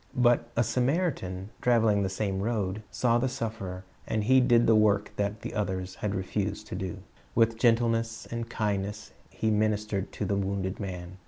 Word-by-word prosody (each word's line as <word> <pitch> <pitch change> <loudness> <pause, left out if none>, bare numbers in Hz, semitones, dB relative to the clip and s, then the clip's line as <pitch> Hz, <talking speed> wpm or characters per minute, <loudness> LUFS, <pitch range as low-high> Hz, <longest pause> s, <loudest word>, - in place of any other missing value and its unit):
But 120 -1 +3
a 120 - +5
Samaritan, 120 - -1
traveling 115 -4 +3
the 95 - 0
same 95 0 -2
road, 105 -2 -1
saw 120 -1 +2
the 130 +2 +1
suf 115 -3 -3
ferer, 90 -1 -6 0.2
and 110 -1 0
he 130 +4 +5
did 120 -2 +4
the 115 - +5
work 105 -1 +3
that 105 +1 -1
the - - -5
others 95 -3 -2
had 105 +1 -3
refused 100 +2 -2
to - - -4
do. 95 -2 -5 0.3
With 115 -1 +3
gentleness 115 -1 +2
and 115 0 -4
kindness 105 -1 -2 0.2
he 110 - -1
ministered 105 -2 0
to 105 - -3
the 100 +1 0
wounded 95 -1 -2
man. 90 -2 -6
105 Hz, 175 wpm, -28 LUFS, 95-115 Hz, 0.3 s, a